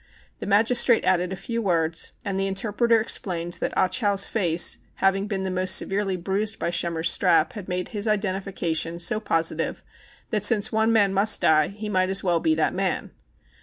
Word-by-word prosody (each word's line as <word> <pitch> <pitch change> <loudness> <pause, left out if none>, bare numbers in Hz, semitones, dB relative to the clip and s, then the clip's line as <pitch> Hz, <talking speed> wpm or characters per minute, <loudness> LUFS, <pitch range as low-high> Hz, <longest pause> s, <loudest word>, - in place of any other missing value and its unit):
The - - -7
magistrate 225 +3 +3
added 180 0 +1
a - - -3
few 230 +5 -5
words, 165 -5 -1
and 195 -1 -3
the 195 - -1
interpreter 225 +4 +1
ex 220 - +1
plained 175 -2 -5
that - - -2
Ah - - +3
Chow's 200 0 +1
face 175 -6 +1 0.2
having 195 +1 0
been 195 -2 -3
most 185 0 +2
severely 195 -1 0
bruised 200 +4 -2
by 170 - -3
Schemmer's 170 -1 +1
strap 170 -4 +2
had 205 -5 -9
made 180 0 -3
his 210 -1 -3
identification 190 -5 -2
so 175 +5 0
positive 165 -5 -2 0.5
that, 210 -3 -1
since 205 -1 +4
one 220 +1 +1
man 205 -4 +2
must 205 +3 +4
die, 155 -1 +3
he 210 +2 -8
might 185 -2 0
as 195 +1 +2
well 175 -3 +1
be 315 - +1
that - - 0
man. - - -3
195 Hz, 185 wpm, -23 LUFS, 175-210 Hz, 0.5 s, since